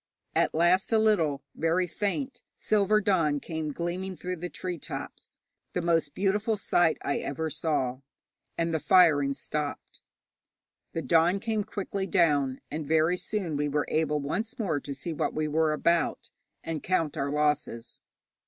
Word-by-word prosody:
At - - +2
last 175 +5 +3
a 225 - +5
little 165 -11 +2
very 165 +3 +1
faint 210 - -3
silver 215 0 +2
dawn 165 -8 +2
came 160 0 -4
gleaming 180 +4 -3
through 180 +1 -4
the 175 +2 -5
tree 180 -2 -5
tops - - -8 0.4
the - - 0
most 165 -4 +1
beautiful 210 +3 +1
sight 175 -4 +2
I 140 - 0
ever 160 +3 -3
saw 130 -6 -1 0.6
and 165 0 0
the 160 - +1
firing 145 -6 +5
stopped. 150 0 -5 0.9
The 165 - -2
dawn 170 +7 +3
came 220 0 -1
quickly 195 -1 -4
down, 145 -7 +2
and 155 0 -4
very 160 +3 +3
soon 180 -4 -2
we 145 0 0
were 145 +1 0
able 155 -1 +1
once 205 - -3
more 180 - 0
to 140 - -6
see 140 +5 -5
what - - -2
we 155 0 0
were 155 +1 +2
about, 170 +2 0 0.3
and 160 -3 -3
count 165 -5 0
our 140 - -1
losses. 150 -5 -1
165 Hz, 155 wpm, -28 LUFS, 150-185 Hz, 0.9 s, a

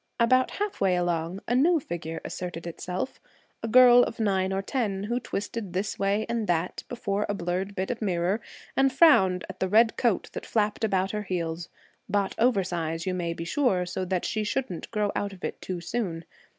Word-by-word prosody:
About 255 +2 +4
half 415 0 -3
way 190 -2 +3
along, 175 +1 -1
a 240 - +1
new 320 +7 +4
figure 165 - -5
asserted 175 -2 -5
itself 180 +7 -4 0.4
a 230 - -3
girl 245 +1 +8
of - - -1
nine 190 -3 +1
or 195 0 -1
ten, 200 -5 -1
who 240 +4 -1
twisted 210 -4 -4
this 195 +2 -2
way 200 +2 +1
and 230 -2 -1
that 175 0 -1
before 210 -4 -2
a 205 - 0
blurred 185 +2 -2
bit 190 +3 -1
of 240 - -5
mirror 185 +1 0 0.3
and 270 0 +4
frowned 195 - +5
at 190 - -9
the 190 - 0
red 225 +3 +4
coat 235 -6 +1
that - - -5
flapped 210 0 0
about 195 -3 +1
her 210 - -2
heels, 170 -3 -3 0.4
bought 200 -1 +1
oversize, 175 -8 +1
you 185 - 0
may 175 -2 -2
be 165 0 -5
sure, 190 -4 +1
so 180 +1 -3
that 185 -1 -1
she 215 - -1
shouldn't 210 -5 -3
grow 210 -2 0
out 200 -1 -2
of 185 - -14
it - - -4
too 185 -2 -4
soon. 170 -3 -3
195 Hz, 195 wpm, -27 LUFS, 180-230 Hz, 0.4 s, girl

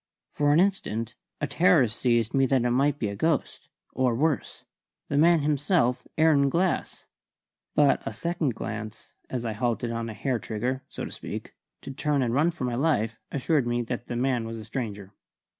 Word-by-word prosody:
For 145 0 +2
an 150 - +5
instant 125 - 0 0.3
a - - 0
terror 160 -1 +4
seized 115 +1 0
me 135 -1 +3
that 130 -2 +2
it 120 - +2
might 140 +3 +2
be 110 -7 -1
a 100 - -5
ghost 160 +8 -1 0.2
or, 130 -3 +1
worse, 150 +2 -1 0.5
the 140 - 0
man 170 0 +5
himself, 145 -3 +1
Aaron 150 -3 +4
Glass. 175 +4 -1 0.7
But 145 -2 +4
a - - -4
second 155 +1 -1
glance, 110 -1 -6 0.2
as 125 -2 -3
I 110 - -1
halted 120 +1 -1
on 115 0 -3
a 110 - -7
hair 125 +3 -1
trigger 125 +5 -3
so - - -5
to - - -8
speak - - -7 0.3
to - - -7
turn 140 0 0
and 120 -1 0
run 150 +6 +3
for 160 -6 -6
my 125 -1 -1
life, 120 -5 0
assured 140 -1 +1
me 120 0 0
that 120 +1 -5
the 120 - -4
man 125 -2 0
was 115 0 -6
a 110 - -8
stranger. 105 -4 -5
130 Hz, 190 wpm, -27 LUFS, 115-145 Hz, 0.7 s, an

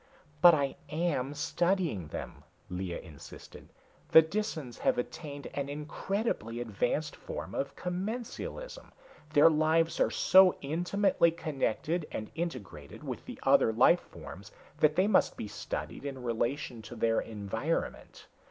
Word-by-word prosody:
"But 175 -2 +9
I 140 -2 -1
am 150 -4 -1
studying 165 - 0
them," 75 -1 -7 0.3
Lea 90 -1 -3
insisted. 75 -4 -12 0.4
"The 160 - +9
Disans 160 - -4
have - - +2
attained 145 +3 -5
an 140 -1 -3
incredibly 150 - -3
advanced 120 +7 -1
form - - -7
of 140 0 -3
commensalism. 230 - -5 0.4
Their 150 +2 +7
lives 160 +1 +2
are - - +4
so 190 -1 +6
intimately 175 +4 +2
connected 155 0 -2
and 110 - -5
integrated 100 - -6
with - - -5
the - - -8
other - - +5
life 130 +10 +5
forms 95 +5 -11 0.3
that 150 0 +4
they 185 +3 +4
must 205 -2 +3
be - - -4
studied 85 - -5
in 135 -3 -6
relation 120 +1 -2
to 110 +3 -10
their 115 0 +2
environment. 110 +8 -4
145 Hz, 130 wpm, -30 LUFS, 115-170 Hz, 0.4 s, But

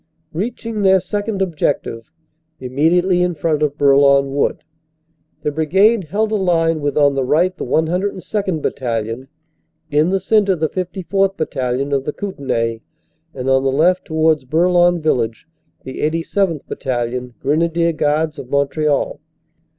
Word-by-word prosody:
Reaching 220 +4 -4
their 190 -1 +5
second 205 +2 -2
ob 175 -4 -4
jective, 115 -6 -2 0.5
immediately 170 +8 +2
in 180 -1 0
front 155 0 -1
of 150 -1 0
Bourlon 140 -1 +4
Wood, 140 - 0 0.8
the 150 - 0
brigade 190 +7 +2
held 210 +7 -1
a 215 - +1
line 165 -4 +1
with 145 0 -2
on 145 -1 +4
the 135 -1 0
right 170 +8 +2
the - - -5
102nd. 185 +1 -1
Battalion, 115 0 -3 0.6
in 150 +3 +3
the 195 +1 +1
cen 210 +2 +2
tre 190 - +3
the 160 -2 -1
54th. 190 +1 -1
Battalion, 135 -2 -2
of 135 -1 0
the 150 - -3
Kootenay, 125 - -3 0.5
and 130 -1 -5
on 130 0 +3
the 135 - +1
left, 175 +7 +2
towards 160 -2 +1
Bourlon 175 +4 +3
village, 115 -7 -1 0.4
the 130 - -8
87th. 165 +1 -1
Battalion, 125 -1 -3
Grenadier 165 +3 +1
Guards 155 +1 0
of 125 - -9
Montreal. 140 +1 0
155 Hz, 145 wpm, -18 LUFS, 140-180 Hz, 0.8 s, their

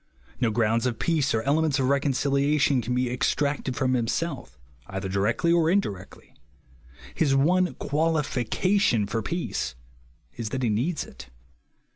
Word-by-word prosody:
No 120 -3 +1
i^ounds 115 +2 +1
of 120 -2 -2
peace 155 -2 +1
or 110 - 0
elements 145 +1 +2
of 130 -2 +1
reconciliation 140 0 +2
can 125 +2 -2
Ue 125 -1 0
extracted 140 +1 -1
from 130 +2 +1
himself, 130 - -2 0.3
either 95 0 -4
directly 100 - +1
or 165 -2 +3
indirectly. 105 - -3 0.8
His 140 -4 +2
one 180 +6 +2
qualification 150 - +1
for 115 +3 -2
peace 165 - -3 0.6
is, 115 -3 -4
that 130 +4 -3
he 120 - +2
needs 130 +10 0
it. 65 -1 -12
130 Hz, 135 wpm, -26 LUFS, 115-155 Hz, 0.8 s, or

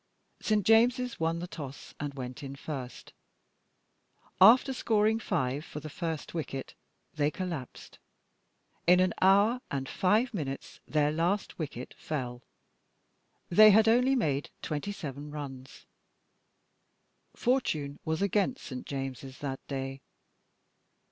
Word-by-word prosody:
St. 210 -3 +1
James's 240 +2 +4
won 165 +1 +1
the 175 +1 -5
toss 140 -6 -8
and 145 -1 -4
went 125 -2 -6
in 140 -1 -6
first. 135 -4 -7 1.3
After 250 +7 +8
scoring 220 -2 +2
5 145 - -1
for 150 - -7
the 150 0 -8
first 160 -1 -4
wicket 135 -5 -4 0.4
they 150 -2 +1
collapsed; 165 -7 -6 0.9
in 180 +1 +7
an 185 -1 +3
hour 205 +6 +5
and 135 -1 -3
five 215 - +2
minutes 140 -8 -5
their 150 -1 +2
last 175 +7 -1
wicket 135 -5 -5
fell. 125 -5 -4 1.1
They 215 +5 +8
had 220 +2 +6
only 250 +4 +4
made 145 - 0
27 150 -3 -4
runs. 135 -3 -8 1.5
Fortune 155 - 0
was 160 +4 -1
against 205 +6 +1
St. 130 -2 -7
James's 135 -1 -5
that 135 -2 -4
day. 135 -1 -4
155 Hz, 115 wpm, -30 LUFS, 135-210 Hz, 1.5 s, After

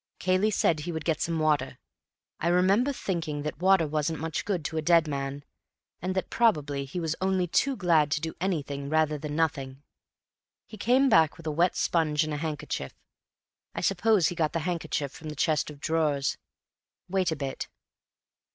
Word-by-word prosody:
Cayley 185 +3 +2
said 170 -6 +2
he 165 +4 -4
would 160 -2 -5
get 160 -3 0
some 165 -1 0
water. 150 -4 +1 0.6
I 170 - -1
remember 190 +9 +3
thinking 165 - -3
that 150 -1 -4
water 190 -2 +5
wasn't 155 +1 -1
much 160 -1 -3
good 185 -7 -2
to 160 - -3
a - - +1
dead 165 0 +4
man, 140 0 -4 0.6
and 185 +2 -2
that 190 - -2
probably 150 -12 +1
he 140 +7 -5
was 165 -1 -1
only 190 -1 +1
too 270 +10 +1
glad 165 -7 +3
to - - 0
do 160 +1 -4
anything 140 -6 -2
rather 155 -1 +1
than 150 0 -5
nothing. 145 -4 -1 0.8
He - - -11
came 255 +5 +3
back 165 - +4
with 165 - -13
a 155 - -1
wet 170 +4 +2
sponge 155 -2 +1
and 155 -1 -3
a - - -2
handkerchief. 150 - -4 0.8
I - - -2
suppose 195 -2 +3
he - - -4
got 155 -3 0
the 165 - -1
handkerchief 160 -5 -2
from 155 +1 -9
the 150 - -6
chest 155 +1 +1
of 145 -2 -11
drawers. 150 -3 0 0.7
Wait 185 -2 0
a - - 0
bit." 140 -2 -4
160 Hz, 185 wpm, -27 LUFS, 150-180 Hz, 0.8 s, water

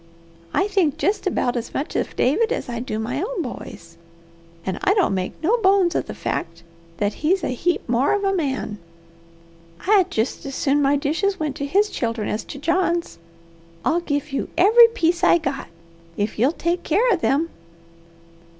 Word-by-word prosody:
I 385 - +1
think 360 -8 +1
jest 400 0 0
about 245 -9 0
as 240 -1 -5
much 285 - -3
of - - -2
David 420 - +2
as - - -2
I 235 -1 -3
do 235 -3 -4
my 245 +6 -2
own 405 -3 -2
boys, 170 - -9 0.7
and 190 -1 -3
I 395 - +3
don't 385 - +2
make 185 -1 -2
no 430 +9 +3
bones 380 -4 +3
of - - -1
the - - -6
fact 165 0 -4 0.3
that 205 0 0
he's 345 +3 +2
a - - -1
heap 345 +7 -1
more 245 +3 +2
of 405 - -2
a 390 0 +2
man. 270 - -2 1.1
I'd 390 -3 +4
jest 225 -6 -2
as 270 - -5
soon 285 +1 +2
my 280 0 +3
dishes 325 +8 0
went 300 -3 -2
to 280 - -3
his 405 +7 +2
children 230 -3 -2
as 215 - -2
to 280 - -8
John's. 340 +3 0 0.7
I'll 340 +2 +2
give 290 -2 -2
you 275 - -2
every 445 +6 +8
piece 350 -6 0
I 355 - +6
got, 275 -4 -4 0.5
if 205 +1 -2
you'll 255 +6 +4
take 345 +1 -1
keer 415 +10 +2
of 360 - -1
them." 310 +5 +1
310 Hz, 185 wpm, -22 LUFS, 255-375 Hz, 1.1 s, every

